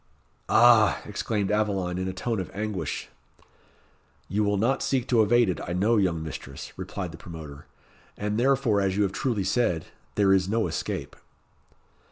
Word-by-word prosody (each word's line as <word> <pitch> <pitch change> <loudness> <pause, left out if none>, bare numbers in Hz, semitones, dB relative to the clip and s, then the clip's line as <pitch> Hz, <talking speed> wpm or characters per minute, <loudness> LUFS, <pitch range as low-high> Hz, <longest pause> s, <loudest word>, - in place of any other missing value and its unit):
"Ah!" 115 -2 +6
exclaimed 105 -1 -2
Aveline, 95 -4 0
in 95 - -2
a - - -1
tone 110 +4 -2
of 95 - -4
anguish. 100 -6 -3 1.2
"You 105 +3 0
will 100 0 +1
not 120 +7 +1
seek 130 -2 0
to 120 -3 +5
evade 120 +2 +4
it, 90 - -1
I 85 - -4
know, 105 +6 +2
young 85 -5 +1
mistress," 70 -4 -8
replied 95 -1 -5
the 80 - -11
promoter; 75 -4 -10 0.5
"and 105 +1 -2
therefore, 125 -5 +2
as 95 0 0
you 105 - +3
have 95 - 0
truly 110 -2 -1
said, 95 -5 +1 0.3
there 100 -2 +4
is 95 0 +2
no 115 +1 +1
escape." - - -4
100 Hz, 165 wpm, -26 LUFS, 90-110 Hz, 1.2 s, Ah